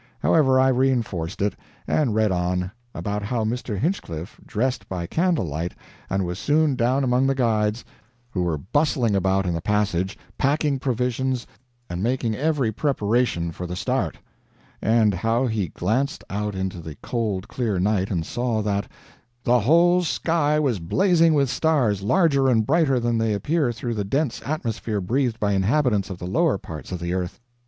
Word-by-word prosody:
However, 130 -5 +4
I 130 0 +5
reinforced 120 -10 0
it, 105 - 0 0.3
and 130 -9 +1
read 110 -2 +2
on, 90 +1 -1 0.2
about 105 0 -3
how 110 +2 -1
Mr. 115 -1 -2
Hinchliff 95 - -3
dressed 125 +4 -2
by 90 -2 -3
candle 165 - +1
light 80 +3 -4 0.3
and 95 -1 0
was 90 +2 -4
"soon 145 +3 +2
down 125 +3 +1
among 130 +1 +2
the 135 - +1
guides, 110 -3 +1 0.5
who 95 - -1
were 85 -3 0
bustling 120 - +1
about 95 0 +1
in 90 - 0
the 85 - -2
passage, 100 -1 0 0.2
packing 145 0 +1
provisions, 125 0 -1 0.4
and 85 +1 -4
making 120 0 0
every 140 -2 0
preparation 115 - 0
for 90 +2 -6
the 90 - -4
start"; - - -1 0.6
and 110 -2 +3
how 115 +7 +1
he 110 -6 -1
glanced 130 - -1
out 105 0 -2
into 95 -1 -3
the 80 -2 -8
cold 105 -5 -2
clear 115 -6 -1
night 95 0 +1
and 85 -5 -1
saw 120 -3 -1
that 100 -1 -1 0.6
"The 125 +1 +4
whole 170 - +4
sky 160 -2 +1
was 130 -9 +1
blazing 165 - +3
with 140 -2 +3
stars, 125 - +1
larger 140 - +3
and 110 -3 +3
brighter 145 -3 +3
than 120 -1 0
they 110 -1 +1
appear 145 - +1
through 120 +1 -4
the 105 -2 -2
dense 135 +6 -1
atmosphere 115 -7 -2
breathed 120 +4 0
by 105 -1 +1
inhabitants 105 +1 +2
of 95 - -5
the 90 - -7
lower 145 - +2
parts 80 -2 -9
of 90 - -3
the 85 +1 -2
earth. 90 +2 -3
115 Hz, 170 wpm, -23 LUFS, 95-135 Hz, 0.6 s, I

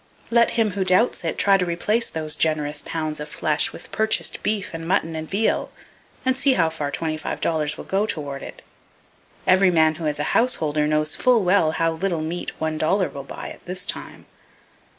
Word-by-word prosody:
Let 235 0 +5
him 220 -2 +2
who 195 0 -1
doubts 185 +5 +2
it, 165 - -2
try 200 -1 +4
to 180 - 0
replace 210 +7 0
those 155 -1 -4
generous 150 -2 0
pounds 155 -2 -3
of 150 0 -6
flesh 155 0 +1
with - - -12
purchased 220 0 0
beef 210 -2 -1
and 165 0 -6
mutton 165 -2 0
and 160 0 -5
veal, 210 +3 0 0.6
and 260 0 +3
see 270 0 +4
how 165 -7 +2
far 150 -3 -3
twenty 155 +1 -2
five 155 - -4
dollars 150 -2 0
will - - -7
go 200 +3 0
toward 140 -7 -4
it. - - -10 0.8
Every 185 +1 +5
man 160 -2 +4
who 160 - -1
is 150 0 -1
a 150 - -1
householder 155 -11 +1
knows 155 0 +1
full 245 -4 +3
well 180 -4 +3
how 165 0 +1
little 170 0 -2
meat 165 +3 -5
one 155 -1 -2
dollar 185 +4 +2
will 140 - -8
buy - - -7
at - - -13
this 180 +1 -1
time. - - -4
165 Hz, 200 wpm, -23 LUFS, 155-195 Hz, 0.8 s, Let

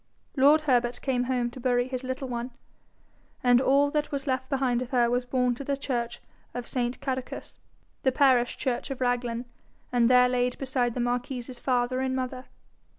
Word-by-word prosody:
Lord 290 +3 +6
Herbert 245 -4 +1
came 250 -2 0
home 245 -2 0
to 255 - -10
bury 245 0 +1
his 255 0 -4
little 260 +1 -4
one, 240 0 -4 0.9
and 245 0 +5
all 280 +2 +3
that 300 0 -1
was 280 -1 -3
left 260 -1 -1
behind 260 -3 +1
of 250 - -5
her 240 -2 +2
was 245 0 0
borne 250 0 +1
to 250 - -7
the 280 0 -1
church 240 -4 -3 0.4
of 245 -1 -4
St. 245 0 -2
Cadocus, 260 -2 -5 0.4
the 260 - +2
parish 255 -3 +3
church 250 +1 -2
of 270 - -5
Raglan, 245 -1 -1 0.5
and 240 -1 +3
there 250 0 +6
laid 250 0 0
beside 255 -3 -1
the - - -2
marquis's 245 0 -2
father 250 0 0
and 260 0 -1
mother. 255 0 -4
250 Hz, 180 wpm, -27 LUFS, 245-265 Hz, 0.9 s, Lord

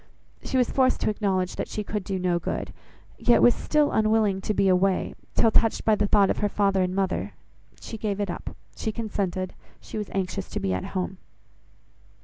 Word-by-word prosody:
She 265 - -1
was 250 -2 +2
forced 260 -1 +2
to - - +2
acknowledge 190 -3 -1
that - - -2
she 210 - -4
could 205 -1 -3
do 190 0 -3
no 180 -1 +1
good, - - -4 0.5
yet 240 - +4
was 245 - +7
still 300 -1 +1
unwilling 215 -3 +2
to 215 - -2
be 195 - +3
away, 185 0 +2 0.2
till, 225 - +4
touched 225 0 +2
by 220 - +5
the 205 0 +2
thought 200 -1 +4
of - - -2
her 205 - +1
father 195 -2 +2
and 185 0 0
mother, 195 -1 -1 0.5
she 225 - -8
gave 205 -2 -2
it 200 -3 -1
up; - - -7 0.2
she 220 - -2
consented, 195 -5 -3 0.3
she 220 - -6
was 210 - -5
anxious 190 0 -3
to - - -3
be 95 - -1
at 95 - -2
home. 185 +1 -3
200 Hz, 200 wpm, -26 LUFS, 185-215 Hz, 0.5 s, was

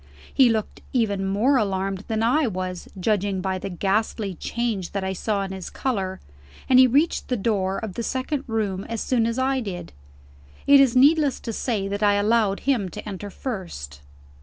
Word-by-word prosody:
He 265 -3 +6
looked 220 -2 -2
even 205 -6 +1
more 225 +8 +3
alarmed 195 -2 -1
than 220 -1 -1
I 275 +5 +3
was, 185 -3 -4
judging 200 -1 0
by 190 0 -2
the 195 - -5
ghastly 200 +2 -1
change 220 0 -3
that 200 -1 -2
I 190 0 -1
saw 200 +1 -1
in 195 - -5
his 190 -2 -6
color; 195 -8 -2 0.5
and 255 -1 +6
he 260 - +8
reached 290 +7 +1
the 250 - 0
door 195 -2 0
of 220 -4 -5
the 235 - -4
second 260 +4 -2
room 205 -4 -1
as 230 -1 -4
soon 230 -1 +1
as 230 +1 -2
I 265 +1 +1
did. 195 - -6 0.7
It 280 0 +7
is 265 -3 +4
needless 285 +1 +4
to 230 - -5
say 210 -4 -1
that 200 +1 -3
I 205 -1 +4
allowed 205 -1 +2
him 240 -9 +1
to 175 - -8
enter 205 0 -6
first. 170 - -6
210 Hz, 185 wpm, -24 LUFS, 190-245 Hz, 0.7 s, he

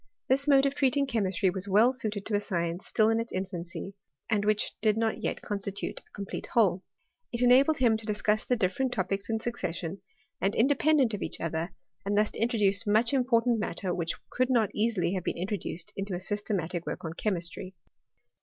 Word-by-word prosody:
This 275 +2 +2
mode 275 -1 +6
of 275 - +1
treating 280 0 +2
chemistry 195 -7 +1
was 190 +1 -1
well 215 +6 +5
suited 215 -5 -3
to 210 - 0
a - - +3
science 175 -3 -2
still 215 - +3
in 225 0 +2
its 230 +1 -4
infancy, 185 0 -5 0.4
and 205 -2 +2
which 210 0 +1
did 215 -1 +3
not 225 -1 0
yet - - -3
constitute 200 -1 -3
a - - -26
com 200 - -5
plete - - -5
whole. 195 -6 +3 0.5
It 235 +1 -1
enabled 270 +5 +5
him 235 -4 +3
to 220 - -7
discuss 210 0 +1
the 250 - +1
different 240 +5 0
topics 195 +1 -2
in 225 0 0
succession, 185 -6 -4 0.4
and 195 +1 +1
independent 275 -1 +3
of 205 - -3
each - - -3
other: 165 +2 -3 0.3
and 205 +1 0
thus 210 0 +3
to - - -8
introduce 210 -4 +2
much 220 +5 +3
important 240 -3 +2
matter 195 -3 -2
which 170 -2 -2 0.2
could 255 +1 +1
not 230 -6 +2
easily 210 -5 +1
have 185 -3 -2
been - - -2
introduced 180 -2 -4
into 195 -1 -3
a - - -3
systematic 185 -4 -2
work - - -4
on 160 - -4
chemistry. 185 -1 -3
210 Hz, 195 wpm, -29 LUFS, 190-235 Hz, 0.5 s, mode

